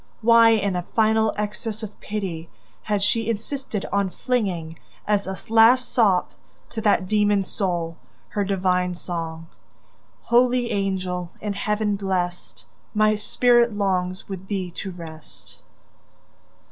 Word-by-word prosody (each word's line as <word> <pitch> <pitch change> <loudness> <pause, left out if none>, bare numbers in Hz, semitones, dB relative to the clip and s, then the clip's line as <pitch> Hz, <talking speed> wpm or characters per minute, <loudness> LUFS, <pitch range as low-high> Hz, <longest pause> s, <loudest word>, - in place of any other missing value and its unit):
Why, 230 0 +7
in 200 -4 +2
a 180 - 0
final 220 +3 +2
access 210 +1 -4
of 215 - -8
pity, 185 -6 -4 0.3
had 205 -2 -1
she 225 +2 +1
insisted 230 0 -3
on 200 -1 +2
flinging, 180 -9 -2 0.3
as 205 -2 +1
a 190 0 -4
last 230 +3 +5
sop 200 -7 +3 0.4
to 225 - -4
that 200 -3 +2
demon's 205 -1 +2
soul, 170 -4 -2 0.3
her 205 - -1
divine 180 -2 0
song: 165 -2 -5 0.8
"Holy 245 0 +3
angel, 185 -3 -2
in 210 -1 -3
Heaven 210 0 -1
blessed, 180 -3 -3 0.3
My 215 0 +4
spirit 235 +2 +3
longs 185 -2 -1
with 190 -1 -7
thee 190 -3 -3
to 190 - -6
rest!" 165 -3 -11
200 Hz, 125 wpm, -23 LUFS, 180-220 Hz, 0.8 s, Why